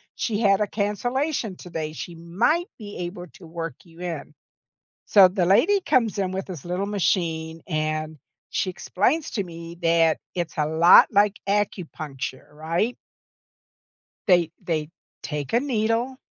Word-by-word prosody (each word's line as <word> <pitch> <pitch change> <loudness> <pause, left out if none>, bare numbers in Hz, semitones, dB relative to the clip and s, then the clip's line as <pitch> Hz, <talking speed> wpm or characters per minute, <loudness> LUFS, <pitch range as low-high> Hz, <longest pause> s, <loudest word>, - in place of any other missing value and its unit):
she 215 -3 -1
had 200 -2 +4
a 210 - +2
cancellation 225 +3 -1
today, 160 -3 -5
she 170 +2 -7
might 230 - +1
be 205 -2 -8
able 175 0 -5
to 190 -4 -13
work 165 0 -5
you 165 -1 -18
in." 165 -4 -5 0.7
So, 195 -3 +8
the 180 -1 0
lady 330 - +4
comes 230 - +2
in 190 -2 0
with 190 +1 -4
this 175 -7 -8
little 180 +3 -2
machine, 165 -5 -1
and 155 -1 -2 0.3
she 190 - 0
explains 245 - 0
to 200 - -1
me 170 -1 -9
that 165 -1 +3 0.2
it's 175 -2 -3
a 150 - +2
lot 160 +3 +7
like 205 0 +3
acupuncture, 155 -10 -3
right? 165 +10 -1 1.3
They 175 -4 +4
they 155 -2 -2 0.3
take 150 -3 -4
a 235 - +4
needle 240 0 0
180 Hz, 145 wpm, -24 LUFS, 165-210 Hz, 1.3 s, So